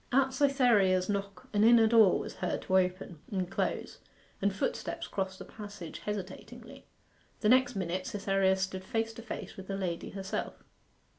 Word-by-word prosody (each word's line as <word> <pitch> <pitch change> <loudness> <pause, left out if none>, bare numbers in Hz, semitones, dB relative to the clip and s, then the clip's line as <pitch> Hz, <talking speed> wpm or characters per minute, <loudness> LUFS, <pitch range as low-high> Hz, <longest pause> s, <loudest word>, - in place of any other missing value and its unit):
At 265 0 +3
Cytherea's 235 -10 +3
knock 200 -2 -3
an 205 0 +3
inner 230 0 +7
door 220 -4 +6
was - - -6
heard - - -2
to 190 0 +4
open 180 -2 -2
and 185 -3 -1
close, 195 - -3 0.4
and 200 +1 +2
footsteps 195 - -3
crossed 190 -1 -3
the - - -9
passage 205 -6 -9
hesitatingly. 225 +6 -7 0.5
The 210 - +3
next 255 0 +4
minute 185 -1 -2
Cytherea 195 -1 +2
stood 190 0 -3
face 225 +3 -2
to 230 - -9
face 225 - -7
with 190 -1 -9
the 195 - -3
lady 175 -3 -3
herself. 195 -1 -5
200 Hz, 160 wpm, -31 LUFS, 190-225 Hz, 0.5 s, inner